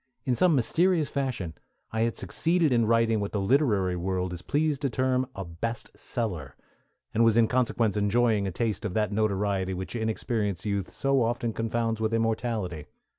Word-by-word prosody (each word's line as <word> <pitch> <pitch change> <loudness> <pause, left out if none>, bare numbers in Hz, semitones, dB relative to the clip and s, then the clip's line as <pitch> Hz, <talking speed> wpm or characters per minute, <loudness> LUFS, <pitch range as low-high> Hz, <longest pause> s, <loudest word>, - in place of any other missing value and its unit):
In 130 - +2
some 170 +5 +4
mysterious 160 +5 +2
fashion 125 - -2 0.4
I 110 - -1
had 115 0 +1
succeeded 165 -4 +1
in 115 -2 +3
writing 115 -1 +3
what 100 0 -3
the 105 - 0
literary 100 -5 +2
world 90 0 -2
is 85 - -7
pleased 150 +5 0
to 140 - +1
term 130 +1 +1
a 95 - -5
"best 100 +8 -5
seller," 95 - -3 0.6
and 115 - +3
was 115 -1 +4
in 115 -1 +5
consequence 120 -4 +1
enjoying 105 0 +2
a - - -2
taste 110 +2 -2
of 105 -5 -3
that 105 -2 +1
notoriety 100 -3 0
which 95 +5 -5
inexperienced 110 -4 -2
youth 100 -3 -1
so 135 -1 +1
often 120 0 0
confounds 115 0 -1
with 110 +1 +1
immortality. 110 -8 -1
115 Hz, 175 wpm, -27 LUFS, 100-120 Hz, 0.6 s, in